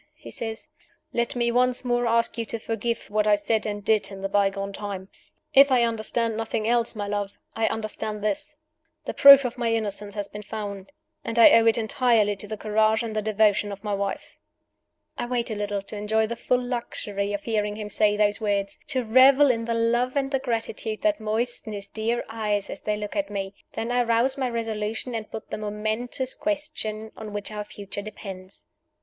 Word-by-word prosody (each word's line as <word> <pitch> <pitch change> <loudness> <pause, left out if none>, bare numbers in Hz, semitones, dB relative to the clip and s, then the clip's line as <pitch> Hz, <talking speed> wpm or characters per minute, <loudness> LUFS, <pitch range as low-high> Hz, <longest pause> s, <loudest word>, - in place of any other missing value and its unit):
he - - -12
says; 225 -1 -5 0.5
"let 235 +1 0
me 235 -1 +1
once 250 +1 +2
more 240 -1 +1
ask 230 0 +2
you 230 - -2
to 230 - -3
forgive 225 +1 -3
what 210 0 +1
I 210 - +6
said 215 +2 0
and 205 -1 -4
did 215 -2 +4
in 195 -1 -9
the - - +1
bygone 195 0 0
time. 195 -2 -6 0.4
If 275 +1 +8
I 250 -2 +5
understand 230 0 0
nothing 225 0 -2
else, 235 0 +2
my 205 -1 -3
love, 205 -1 -3 0.2
I 225 0 +1
understand 215 -1 -4
this: 215 +8 -2 0.5
The - - -3
proof 280 -1 +9
of 245 0 -4
my 235 -1 +1
innocence 205 -2 -1
has 205 -1 -3
been 210 +1 -8
found; 205 0 -6 0.3
and 230 - -4
I 230 - +9
owe 230 0 +6
it 225 - +5
entirely 225 -2 +2
to 210 - -2
the 215 +1 -5
courage 215 +1 +2
and 220 -2 -5
the 215 - +1
devotion 210 -1 +2
of 200 +1 -8
my 210 -1 -2
wife!" 200 0 -3 0.9
I - - -2
wait 240 -2 -1
a - - -2
little, 205 -1 -2
to 205 - -8
enjoy 215 +2 +1
the 235 +2 -4
full 250 +1 +1
luxury 210 -5 -3
of 205 0 -3
hearing 210 -2 -1
him 210 -1 -5
say 210 0 +2
those 210 0 +2
words 200 -2 -1
to 255 -1 -1
revel 260 +4 +6
in 230 -1 -2
the 230 0 -1
love 240 +3 +1
and 275 -1 0
the 270 - +1
gratitude 225 -3 -3
that 315 -1 +2
moisten 220 +1 -2
his 200 -1 -5
dear 225 +2 -2
eyes 210 -3 -2
as - - -7
they 210 0 -1
look 210 -1 -5
at 300 -1 -1
me. 195 -1 -4 0.2
Then 230 +2 -3
I 245 0 +3
rouse 235 +3 +2
my 260 -2 -1
resolution, 225 0 -3
and 220 -2 -4
put 220 - -8
the - - -3
momentous 215 +5 -2
question 285 -9 -3
on 215 -2 -8
which 205 0 -4
our 210 -1 -4
future 205 -1 -7
depends. 195 -2 -9
220 Hz, 205 wpm, -25 LUFS, 205-235 Hz, 0.9 s, proof